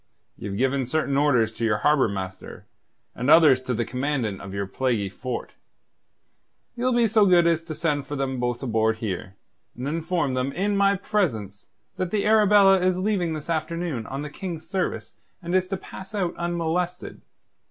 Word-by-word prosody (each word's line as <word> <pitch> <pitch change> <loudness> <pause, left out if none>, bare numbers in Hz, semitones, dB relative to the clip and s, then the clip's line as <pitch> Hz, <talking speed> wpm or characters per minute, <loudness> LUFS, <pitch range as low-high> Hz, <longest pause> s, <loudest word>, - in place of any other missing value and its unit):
Ye've 100 -1 -6
given 130 +1 0
certain 140 0 0
orders 125 -6 +3
to 115 - -6
your 110 -2 +2
Harbour 150 -4 +4
Master, 95 -2 -7 0.5
and 125 +4 -2
others 150 -6 +7
to 130 -1 -3
the 120 +1 -1
Commandant 125 -4 -2
of 95 - -8
your 100 0 -3
plaguey 110 -1 -1
fort. 120 +6 -6 1.2
Ye'll 250 +1 0
be 240 -1 +3
so 215 -1 +4
good 175 -2 +5
as 165 -1 +2
to 155 - -6
send 150 -3 -1
for 145 - -4
them 135 -2 -2
both 120 +1 -2
aboard 110 -2 +1
here, 95 -3 -5 0.4
and 125 +2 -4
inform 165 -2 -1
them 130 +2 -1
in 200 +3 0
my 200 0 +3
presence 115 - -2 0.3
that 185 - -2
the 205 +1 -1
Arabella 205 -3 +6
is 185 0 +2
leaving 185 -4 0
this 155 -2 -6
afternoon 160 -6 -2
on 135 +2 -5
the 150 - -7
King's 165 -1 -6
service 185 0 -3 0.3
and 170 0 -5
is 185 0 +2
to 195 +1 -3
pass 190 +2 -10
out 180 -4 -1
unmolested. 175 +1 -2
150 Hz, 175 wpm, -24 LUFS, 125-180 Hz, 1.2 s, others